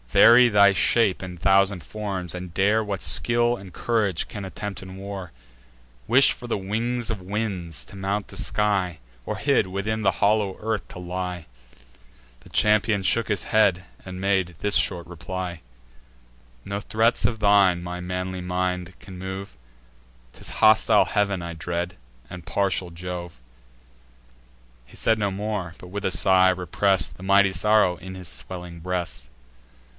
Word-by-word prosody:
Vary 120 Hz, -, +7 dB
thy 100 Hz, -2 st, +6 dB
shape 100 Hz, -1 st, +2 dB
in 90 Hz, -1 st, -7 dB
thousand 95 Hz, 0 st, +3 dB
forms, 95 Hz, -5 st, -5 dB
and 90 Hz, -1 st, -7 dB
dare 105 Hz, +4 st, +2 dB
What 100 Hz, -2 st, -4 dB
skill 120 Hz, +8 st, +2 dB
and 95 Hz, -5 st, -11 dB
courage 105 Hz, -4 st, -1 dB
can 100 Hz, -, -7 dB
attempt 95 Hz, 0 st, -6 dB
in 95 Hz, 0 st, -10 dB
war; 95 Hz, -2 st, -7 dB, 0.7 s
Wish 130 Hz, -, +5 dB
for 120 Hz, -, -10 dB
the 115 Hz, -, -1 dB
wings 115 Hz, +4 st, -2 dB
of 110 Hz, -4 st, -3 dB
winds, 95 Hz, -4 st, -3 dB
to -, -, -14 dB
mount 100 Hz, +2 st, -2 dB
the -, -, -12 dB
sky; 100 Hz, -5 st, 0 dB, 0.3 s
Or -, -, -3 dB
hid, -, -, +2 dB
within 100 Hz, +4 st, -2 dB
the 95 Hz, -3 st, +2 dB
hollow 105 Hz, -2 st, +2 dB
earth 110 Hz, -1 st, -2 dB
to -, -, -9 dB
lie!" 90 Hz, -1 st, -5 dB, 1.0 s
The -, -, -17 dB
champion 105 Hz, -1 st, +2 dB
shook 115 Hz, +5 st, +1 dB
his 100 Hz, -4 st, 0 dB
head, 95 Hz, -5 st, +2 dB, 0.2 s
and 95 Hz, -1 st, -8 dB
made 95 Hz, -3 st, 0 dB
this 105 Hz, 0 st, +1 dB
short 85 Hz, -1 st, +2 dB
reply: 85 Hz, 0 st, -6 dB, 1.0 s
"No 100 Hz, +1 st, -4 dB
threats 115 Hz, +3 st, +1 dB
of 115 Hz, -2 st, 0 dB
thine 100 Hz, -4 st, +4 dB
my 90 Hz, 0 st, -6 dB
manly 90 Hz, +1 st, -4 dB
mind 90 Hz, 0 st, -3 dB
can 95 Hz, -1 st, -11 dB
move; 95 Hz, -4 st, -6 dB, 0.8 s
'Tis -, -, -7 dB
hostile 110 Hz, 0 st, +5 dB
heav'n 100 Hz, -3 st, 0 dB
I 85 Hz, 0 st, -5 dB
dread, 85 Hz, +2 st, -4 dB, 0.3 s
and 90 Hz, -2 st, -9 dB
partial 95 Hz, -2 st, 0 dB
Jove." 85 Hz, -3 st, -7 dB, 1.5 s
He -, -, -17 dB
said 110 Hz, -, +2 dB
no 100 Hz, -1 st, +1 dB
more, 100 Hz, -4 st, -4 dB
but, 90 Hz, -, -12 dB
with 100 Hz, +3 st, -6 dB
a 95 Hz, -, 0 dB
sigh, 95 Hz, +1 st, +4 dB
repress'd 90 Hz, 0 st, +1 dB
The 90 Hz, -, -12 dB
mighty 100 Hz, 0 st, +4 dB
sorrow 105 Hz, -4 st, +3 dB
in 95 Hz, +2 st, -9 dB
his 90 Hz, -2 st, -7 dB
swelling 90 Hz, +2 st, -7 dB
breast. 85 Hz, -8 st, -4 dB
95 Hz, 155 wpm, -24 LUFS, 90-105 Hz, 1.5 s, Vary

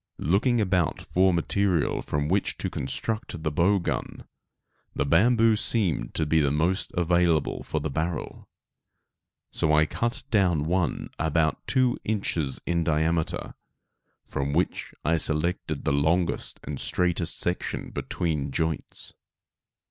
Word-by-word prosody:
Looking 110 Hz, -, +2 dB
about 90 Hz, -5 st, +1 dB
for 95 Hz, +1 st, +2 dB
material 90 Hz, -1 st, +1 dB
from 75 Hz, 0 st, -2 dB
which 95 Hz, +4 st, 0 dB
to -, -, -3 dB
construct 110 Hz, -, -4 dB
the 75 Hz, -, 0 dB
bow 90 Hz, +7 st, +3 dB
gun, 90 Hz, -, -4 dB, 0.7 s
the -, -, 0 dB
bamboo 115 Hz, -, +4 dB
seemed 95 Hz, -, +3 dB
to 80 Hz, -, +1 dB
be 80 Hz, +2 st, +3 dB
the 70 Hz, -2 st, +2 dB
most 85 Hz, +7 st, 0 dB
available 85 Hz, -3 st, +2 dB
for 80 Hz, -, -3 dB
the 75 Hz, +1 st, -3 dB
barrel; 80 Hz, +3 st, -4 dB, 1.0 s
so 80 Hz, -, 0 dB
I 75 Hz, +1 st, +5 dB
cut 120 Hz, -, -2 dB
down 90 Hz, -8 st, +2 dB
one 90 Hz, 0 st, -1 dB
about 80 Hz, 0 st, 0 dB
two 130 Hz, -2 st, +2 dB
inches 85 Hz, -10 st, -1 dB
in 85 Hz, -1 st, 0 dB
diameter, 80 Hz, +1 st, 0 dB, 0.7 s
from 70 Hz, +1 st, -3 dB
which 85 Hz, +4 st, -1 dB
I 85 Hz, +2 st, +3 dB
selected 80 Hz, -1 st, +1 dB
the -, -, +2 dB
longest 80 Hz, +5 st, 0 dB
and -, -, -5 dB
straightest 90 Hz, -1 st, 0 dB
section 90 Hz, +1 st, -2 dB
between 80 Hz, -5 st, -2 dB
the 70 Hz, -, -6 dB
joints. 80 Hz, 0 st, -2 dB
85 Hz, 135 wpm, -26 LUFS, 80-95 Hz, 1.0 s, I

